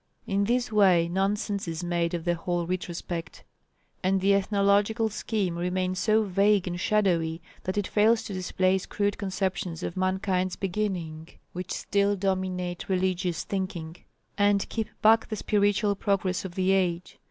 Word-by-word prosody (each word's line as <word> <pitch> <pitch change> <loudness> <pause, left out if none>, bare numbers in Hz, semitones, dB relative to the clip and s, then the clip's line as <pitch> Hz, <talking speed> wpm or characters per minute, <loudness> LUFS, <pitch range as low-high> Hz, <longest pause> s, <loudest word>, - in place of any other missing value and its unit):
In 200 0 +1
this 240 +1 0
way 185 -5 +4
nonsense 200 +2 -1
is 165 +1 -4
made 175 -1 0
of 170 -1 -5
the 175 - +2
whole 175 0 -2
retrospect; 175 -1 -5 0.6
and 190 +1 +2
the 195 +1 +3
ethnological 200 +3 +2
scheme 205 -4 -2
remains 185 +1 -1
so 220 0 +3
vague 200 0 +2
and 175 0 -3
shadowy 175 -6 +1 0.3
that 185 +2 -2
it 205 - +1
fails 220 +3 +3
to 200 - -6
displace 185 0 0
crude 205 -1 -1
conceptions 190 -3 -2
of - - -4
mankind's 185 0 0
beginning 175 -5 -3 0.2
which 180 +1 -5
still 200 0 +1
dominate 185 -2 -2
religious 185 -2 0
thinking, 180 -4 -4 0.4
and 205 -1 +3
keep 225 -2 -3
back 225 +1 +5
the 215 - -2
spiritual 205 0 +2
progress 190 -2 -1
of 180 -2 -7
the 190 0 +2
age. 180 -2 0
190 Hz, 150 wpm, -27 LUFS, 180-205 Hz, 0.6 s, back